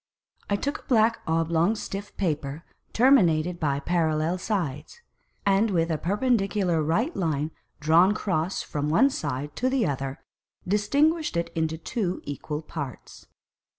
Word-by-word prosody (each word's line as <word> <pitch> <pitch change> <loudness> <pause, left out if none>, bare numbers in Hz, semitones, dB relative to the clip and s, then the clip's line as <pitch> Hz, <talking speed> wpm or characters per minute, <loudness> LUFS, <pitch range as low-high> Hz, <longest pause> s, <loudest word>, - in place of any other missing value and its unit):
I 200 - +2
took 285 +8 -2
a - - -22
black 225 -3 +3
oblong 165 +4 +2
stiff 200 -1 -6
Paper 150 -3 -2 0.3
terminated 180 - +4
by 140 -4 0
Parallel 160 +1 0
Sides, 170 - -3 0.5
and 200 +3 +3
with 170 -3 +1
a 155 - -1
Perpendicular 200 -4 +1
right 205 - 0
Line 155 -4 -1 0.3
drawn 170 +7 +4
cross 180 -3 -1
from 145 0 -3
one 260 - +4
Side 145 - -4
to 255 - +1
the 260 -4 +1
other, 135 -1 -3 0.5
distinguished 280 - +2
it 170 0 -2
into 160 0 -1
two 185 +2 -2
equal 150 +2 -5
Parts. 145 -6 -8
170 Hz, 135 wpm, -26 LUFS, 155-210 Hz, 0.5 s, terminated